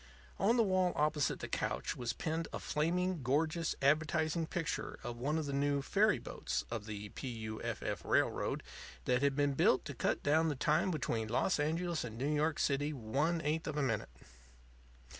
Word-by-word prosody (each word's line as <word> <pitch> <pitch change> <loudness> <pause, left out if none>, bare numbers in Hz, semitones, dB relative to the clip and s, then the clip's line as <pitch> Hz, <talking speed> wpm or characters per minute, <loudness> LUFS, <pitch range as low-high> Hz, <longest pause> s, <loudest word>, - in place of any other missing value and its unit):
On 230 +5 +4
the 230 - +5
wall 185 -3 +2
opposite 150 -1 +1
the - - -3
couch - - -2
was 120 -1 -2
pinned 165 0 -2
a - - -3
flaming, 175 +2 0
gorgeous 155 +6 +1
advertising 155 +2 +2
picture 165 -1 -3
of 120 -1 -4
one 145 +5 0
of 160 - -1
the 140 - -3
new 140 0 +1
ferry 205 +2 +3
boats 120 - -3
of 110 -2 -4
the 105 -1 -5
P. 135 - -7
U. 110 -3 -5
F. 115 -2 -3
F. 100 -5 -3
Railroad - - +1 0.4
that 125 0 +2
had 140 -1 +2
been 145 0 +2
built 130 - +3
to 140 - -5
cut 120 - -1
down 160 +3 +3
the 150 - -1
time 150 +7 +2
between 115 -9 -1
Los 135 - +1
Angeles 165 +2 0
and 115 -2 -6
New 140 +5 0
York 150 +1 +1
City 145 +1 +1
one 145 +7 0
eighth 155 +2 -1
of 150 -1 -3
a 145 - +2
minute. 115 - -1
150 Hz, 190 wpm, -34 LUFS, 125-160 Hz, 0.4 s, the